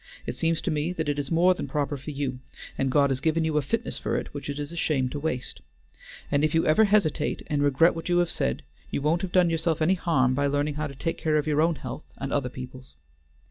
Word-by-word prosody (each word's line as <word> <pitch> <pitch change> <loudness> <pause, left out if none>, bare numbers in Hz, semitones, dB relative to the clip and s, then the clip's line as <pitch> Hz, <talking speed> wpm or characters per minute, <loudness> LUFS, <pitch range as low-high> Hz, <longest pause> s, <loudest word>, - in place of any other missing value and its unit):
It - - -3
seems 165 0 0
to 175 - -1
me 155 +3 -1
that 160 -4 -2
it 145 0 -1
is 140 -2 -3
more 175 +3 +4
than - - -5
proper 145 -2 -1
for 140 +2 -8
you, 135 -3 -3 0.4
and 135 - 0
God 140 0 +4
has 130 - 0
given 160 +2 +1
you 155 -1 0
a - - +3
fitness 135 - -2
for - - -2
it - - -3
which - - -6
it 140 - -3
is 145 +1 -4
a - - -8
shame 140 -6 +1
to 145 - -4
waste. 130 - -3 0.7
And 145 0 +2
if 155 +1 +2
you 165 - +3
ever 185 +9 +5
hesitate 175 -7 +1
and 145 -2 -1
regret 145 +4 +4
what 165 +1 -6
you 175 - +3
have 175 -1 +2
said, 65 - -1 0.3
you - - -1
won't 155 +4 +1
have 190 - -4
done 180 -2 +4
yourself 165 0 0
any 160 +4 +3
harm 135 -9 +2
by 140 +2 +1
learning 145 +1 0
how 150 +1 -2
to 140 - -10
take 165 +5 -3
care 155 -1 +1
of 150 - 0
your 150 -1 +2
own 165 +1 +3
health 150 - -7
and 135 - -4
other 135 -3 0
people's." 130 +1 -10
150 Hz, 260 wpm, -26 LUFS, 140-165 Hz, 0.7 s, ever